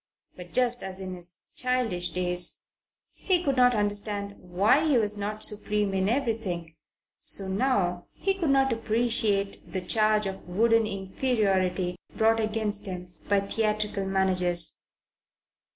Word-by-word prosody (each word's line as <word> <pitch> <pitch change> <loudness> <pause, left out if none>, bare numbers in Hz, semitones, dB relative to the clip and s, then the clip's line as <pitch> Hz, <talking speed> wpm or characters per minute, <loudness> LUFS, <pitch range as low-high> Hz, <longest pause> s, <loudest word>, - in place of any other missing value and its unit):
But 180 -1 -11
just 245 -1 +2
as 190 0 -3
in 185 -1 -5
his 175 -1 -8
childish 250 -8 0
days 180 -1 +1 0.5
he 360 -3 0
could 275 -4 0
not 250 -1 +4
understand 205 -1 -2
why 195 - +2
he 285 -5 +3
was 210 -2 +1
not 210 +1 -4
supreme 210 -1 0
in 190 +1 +1
everything, 220 - -2 0.5
so 195 - +5
now 190 -4 0
he 390 - -1
could 355 -6 -2
not 270 -1 +3
appreciate 220 -3 0
the 190 - -2
charge 215 +2 +2
of 190 -2 -6
wooden 225 +4 +3
inferiority 190 -3 -1 0.2
brought 225 +1 +3
against 215 -1 -2
him 180 -1 -7 0.2
by 200 -1 +3
theatrical 210 -1 -1
managers. 180 -3 +1
205 Hz, 135 wpm, -27 LUFS, 185-225 Hz, 0.5 s, so